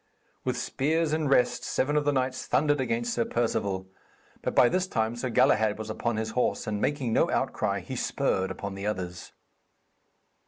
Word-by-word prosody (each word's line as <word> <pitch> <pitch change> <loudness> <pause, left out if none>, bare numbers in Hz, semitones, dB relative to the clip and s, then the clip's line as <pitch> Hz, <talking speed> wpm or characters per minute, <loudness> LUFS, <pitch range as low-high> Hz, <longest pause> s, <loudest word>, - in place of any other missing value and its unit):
With - - -1
spears 155 +3 0
in 155 -1 0
rest, 125 -3 +3
seven 145 +3 0
of 150 -1 +2
the 145 - +3
knights 130 -1 -1
thundered 145 -1 +2
against 120 -1 -1
Sir 120 - +1
Perceval. 100 -5 -1 0.6
But - - -3
by 125 - +7
this 185 +6 0
time 110 -7 -1
Sir 125 +2 -3
Galahad 110 -2 +3
was 110 0 -5
upon 115 +1 -2
his 110 0 -2
horse, 125 +3 0
and, 105 -1 -2
making 135 -6 0
no - - +3
outcry, - - 0
he - - -6
spurred 95 0 0
upon 100 -1 -5
the 100 +1 -4
others. 90 -4 -4
120 Hz, 180 wpm, -28 LUFS, 110-140 Hz, 0.6 s, by